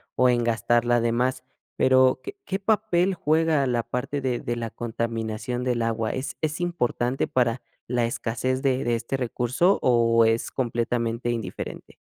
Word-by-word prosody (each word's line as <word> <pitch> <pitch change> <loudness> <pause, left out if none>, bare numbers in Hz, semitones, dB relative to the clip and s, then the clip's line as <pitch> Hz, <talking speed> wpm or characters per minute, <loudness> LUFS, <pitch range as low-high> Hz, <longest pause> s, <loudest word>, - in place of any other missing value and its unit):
o 125 0 +4
en 120 -1 +2
gastarla 120 +1 +2
de 115 0 +1
más, 125 +2 0 0.3
pero, 130 0 +4
¿qué 400 +1 -7
qué 195 - -2
papel 200 -3 +2
juega 155 -2 +2
la 120 -2 0
parte 125 +4 -3
de 125 -2 -1
de 120 - -3
la 115 -1 -4
contaminación 115 +1 -3
del 125 -2 0
agua? 115 -1 -1
¿Es 130 +2 -5
es 155 +2 -2
importante 130 -7 -1
para 120 -1 +1 0.3
la 120 -1 +1
escasez 120 +3 -2
de 135 -1 +1
de 120 0 +1
este 115 +4 -3
recurso, 125 +9 +1
o 115 -2 +4
es 115 +1 +1
completamente 120 -1 -1
indiferente? 110 -6 -6
120 Hz, 160 wpm, -25 LUFS, 115-130 Hz, 0.3 s, o